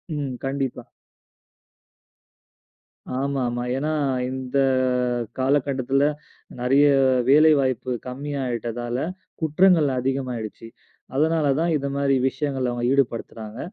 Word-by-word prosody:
ம். 140 -3 -3
கண்டிப்பா. 135 -3 -3 2.3
ஆமா, 140 0 -1
ஆமா. 120 0 -3
ஏன்னா, 150 +3 -1 0.4
இந்த 130 +1 -3 0.8
காலகட்டத்துல 135 0 +1 0.6
நெறைய 135 +4 +4 0.4
வேலைவாய்ப்பு 140 -4 +4 0.2
கம்மியாயிட்டதால 125 -3 -3 0.4
குற்றங்கள் 160 0 +4
அதிகமாயிடுச்சு. 125 -4 -3 0.5
அதனால 160 +1 +2
தான், 170 0 +1
இந்த 140 -1 -3
மாதிரி 140 -1 +2
விஷயங்கள்ல 135 -4 -2
அவங்க 120 0 -4
ஈடுபடுத்துறாங்க. 115 -3 -2
135 Hz, 85 wpm, -23 LUFS, 125-145 Hz, 2.3 s, நெறைய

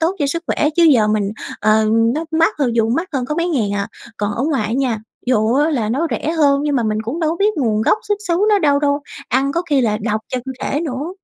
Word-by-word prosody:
tốt 335 +4 0
cho 285 - +1
sức 335 +4 -2
khỏe, 300 - +1
chứ 345 - +4
giờ 245 -9 +5
mình 210 -2 0 0.3
ờ, 215 +1 +3 0.3
nó 320 +2 -2
mắc 330 - +3
hơn, 245 -5 0
dù 225 -1 +2
mắc 330 +9 -1
hơn 260 -3 -1
có 300 - -3
mấy 340 +1 0
ngàn 230 - 0
à. 200 0 -2 0.3
Còn 205 0 -2
ở 240 - -2
ngoài 275 -9 0
á - - -3
nha, 250 -3 0 0.3
dù 225 -2 +2
á 295 +4 +2
là 235 -8 -1
nó 280 +9 0
rẻ 315 - -2
hơn 285 -4 +3
nhưng 295 -2 0
mà 245 - +1
mình 215 -1 -1
cũng 255 +10 -4
đâu 315 -1 +1
có 335 - -2
biết 415 +2 +2
nguồn 220 -6 +1
gốc 420 - +3
xuất 415 0 +1
xứ 340 - +2
nó 415 -1 +4
đâu 285 -4 +3
đâu, 285 0 +1 0.3
ăn 270 +2 +1
có 340 - 0
khi 280 -2 +4
là 215 -3 +1
độc 215 -1 -1
cho 255 - -2
cơ 265 - -5
thể 290 - -1
nữa. 300 +2 -4
275 Hz, 275 wpm, -18 LUFS, 225-320 Hz, 0.3 s, giờ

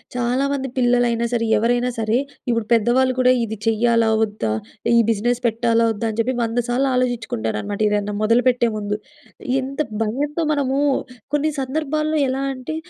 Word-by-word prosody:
చాలా 250 +3 0
మంది 270 -1 -2
పిల్లలైనా 240 -1 +2
సరే 230 -1 +1
ఎవరైనా 245 +3 +1
సరే, 220 +1 +1 0.3
ఇప్పుడు 230 -2 0
పెద్దవాళ్ళు 245 +3 +3
కూడా 255 0 +5
ఇది 220 -1 -4
చేయ్యాలా? 230 0 +2
వద్దా? 205 - -2 0.4
ఈ - - +6
బిజినెస్ 235 +3 0
పెట్టాలా? 230 0 +1
వద్దా? 225 +1 -3
అని 215 - -8
చెప్పి 250 +3 +1
100 230 +1 -1
సార్లు 260 +3 +1
ఆలోచించుకుంటారు 235 - -1
అన్నమాట 205 0 -5
ఏదైనా 210 0 -1
మొదలుపెట్టే 240 +1 +3
ముందు. 210 0 -2 0.6
ఎంత 270 +1 -6 0.3
భయంతో 285 +9 -2
మనము 275 -2 0 0.5
కొన్ని 295 +1 +1
సందర్భాల్లో 305 +3 -1
ఎలా 265 +1 -2
అంటే 255 +4 -6
240 Hz, 150 wpm, -21 LUFS, 225-260 Hz, 0.6 s, ఈ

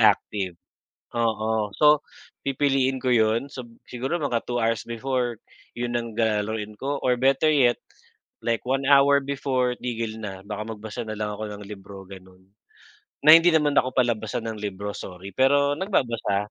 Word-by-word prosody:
active, 95 -5 +2 0.6
oo. 110 -2 0
So 150 -1 +4 0.4
pipiliin 135 -1 +1
ko 130 - +1
yun, 115 +3 +2
so 125 -3 -8 0.2
siguro 130 +6 -3
mga 120 -5 -1
2 120 -1 -1
hours 115 -2 0
before 120 -1 -2 0.3
yun 120 0 -3
ang 115 -2 -6
ga 110 -2 +1
lalaruin 110 -1 -5
ko 140 +1 -3
or 125 -1 +2
better 135 +4 +3
yet 130 -5 +3 0.6
like 115 -1 0
1 135 +1 0
hour 140 0 +6
before 130 -3 0
tigil 115 -2 -4
na. 95 -2 -7
Baka 105 0 -4
magbasa 105 0 -7
na 110 -1 -6
lang 105 -1 -2
ako 110 +1 -5
ng 105 0 -8
libro 100 -1 -10
ganun, 95 -1 -14 0.8
na 155 - +9
hindi 165 +1 +7
naman 150 -2 +3
ako 130 0 0
pala-basa 115 -4 0
ng 110 -1 -5
libro 100 0 -4
sorry, 95 +1 -8
pero 140 +4 +3
nagbabasa. 115 - -1
115 Hz, 160 wpm, -25 LUFS, 105-135 Hz, 0.8 s, na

